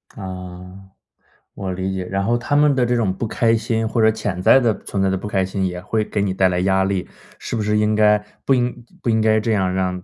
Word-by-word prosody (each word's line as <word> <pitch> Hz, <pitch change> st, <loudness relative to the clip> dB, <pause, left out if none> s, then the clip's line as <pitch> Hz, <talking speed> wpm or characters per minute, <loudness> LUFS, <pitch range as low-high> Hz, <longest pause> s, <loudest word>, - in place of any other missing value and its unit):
啊。 90 Hz, 0 st, -9 dB, 0.7 s
我 95 Hz, -1 st, -4 dB
理 95 Hz, +1 st, -3 dB
解， 95 Hz, -1 st, -3 dB
然 95 Hz, +1 st, -2 dB
后 120 Hz, +2 st, +2 dB
他 120 Hz, +4 st, -4 dB
们 145 Hz, -1 st, +4 dB
的 125 Hz, -2 st, +2 dB
这 120 Hz, 0 st, +1 dB
种 105 Hz, -5 st, 0 dB
不 -, -, -2 dB
开 115 Hz, +1 st, +2 dB
心 115 Hz, 0 st, -1 dB
或 115 Hz, +1 st, 0 dB
者 110 Hz, 0 st, +5 dB
潜 105 Hz, -4 st, -4 dB
在 130 Hz, -, +6 dB
地 120 Hz, -4 st, +2 dB
存 100 Hz, -, -3 dB
在 95 Hz, -, +2 dB
的 95 Hz, -, 0 dB
不 -, -, -8 dB
开 95 Hz, -2 st, 0 dB
心， 95 Hz, 0 st, -2 dB
也 90 Hz, -1 st, -3 dB
会 105 Hz, +3 st, -1 dB
给 105 Hz, -1 st, -2 dB
你 100 Hz, -2 st, 0 dB
带 95 Hz, 0 st, +3 dB
来 90 Hz, 0 st, -1 dB
压 95 Hz, 0 st, +2 dB
力。 95 Hz, -1 st, -1 dB, 0.3 s
是 -, -, -5 dB
不 110 Hz, -, -1 dB
是 105 Hz, 0 st, +1 dB
应 105 Hz, 0 st, +2 dB
该 105 Hz, 0 st, +5 dB, 0.3 s
不 135 Hz, -, +2 dB
应 125 Hz, -1 st, -1 dB, 0.2 s
不 -, -, -2 dB
应 110 Hz, -1 st, +2 dB
该 110 Hz, 0 st, +3 dB
这 110 Hz, +1 st, 0 dB
样 95 Hz, -3 st, 0 dB
让 90 Hz, -1 st, -2 dB
105 Hz, 275 characters per minute, -20 LUFS, 95-115 Hz, 0.7 s, 在